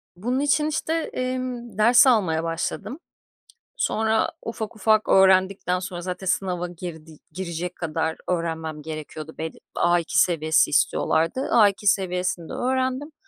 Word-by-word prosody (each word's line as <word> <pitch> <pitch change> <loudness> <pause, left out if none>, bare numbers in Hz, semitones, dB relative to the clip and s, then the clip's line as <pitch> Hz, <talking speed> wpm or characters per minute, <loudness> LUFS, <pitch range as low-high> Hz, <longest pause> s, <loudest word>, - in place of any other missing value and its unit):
Bunun 245 +8 -2
için 290 +1 +2
işte, 310 +1 -2
emm, 255 -7 -3
ders 240 +5 +6
almaya 175 -10 +2
başladım. 170 - -4 0.8
Sonra 220 - +1
ufak 220 -1 -5
ufak 215 +1 +2
öğrendikten 190 -1 +4
sonra 180 -1 -6
zaten 180 +2 -5
sınava 180 -2 -1
girdi 160 -3 -9
girecek 175 0 -5
kadar 160 -1 -2
öğrenmem 160 -3 -3
gerekiyordu 155 0 -7
belli 160 0 -5 0.2
A2 175 -1 +2
seviyesi 160 -3 +3
istiyorlardı. 165 - +1
A2 205 -2 +4
seviyesinde 180 -3 0
öğrendim 260 +3 -1
185 Hz, 120 wpm, -24 LUFS, 165-230 Hz, 0.8 s, ders